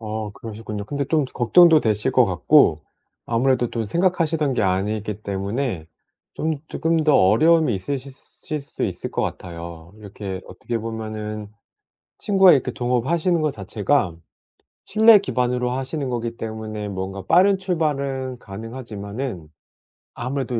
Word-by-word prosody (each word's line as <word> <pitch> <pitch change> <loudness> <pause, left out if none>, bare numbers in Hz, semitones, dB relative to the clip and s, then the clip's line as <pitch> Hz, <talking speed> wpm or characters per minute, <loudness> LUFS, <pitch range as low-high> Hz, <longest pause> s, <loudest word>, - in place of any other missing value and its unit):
아 110 -1 -4
그러시군요. 105 -2 -7
근데 140 +6 -3
좀 150 +1 +1
걱정도 155 +6 +5
되실 105 -2 0
것 - - +5
같고 - - +4 0.4
아무래도 120 +1 +1
또 115 -2 -3
생각하시던 165 - +1
게 115 - +1
아니기 105 +2 -1
때문에 100 - -3 0.5
좀 160 -1 -2
쪼끔 165 0 0
더 150 -2 +4
어려움이 155 - +4
있으실 135 +7 -4
실 150 +2 -8
수 140 - -8
있을 - - -4
것 - - -1
같아요. 85 -1 -7
이렇게 100 -2 -7
어떻게 115 +6 -5
보면은 110 -2 -5 0.7
친구와 195 -3 +5
이렇게 135 - +2
동업하시는 155 +8 0
것 155 -1 +1
자체가 105 - 0 0.7
신뢰 220 +1 +7
기반으로 125 -8 -1
하시는 135 +3 -3
거기 115 -1 -3
때문에 110 -1 -5
뭔가 95 0 -5
빠른 190 - +5
출발은 140 -8 -2
가능하지만은 110 - -7 0.7
아무래도 125 -1 -3
120 Hz, 315 characters per minute, -22 LUFS, 105-145 Hz, 0.7 s, 신뢰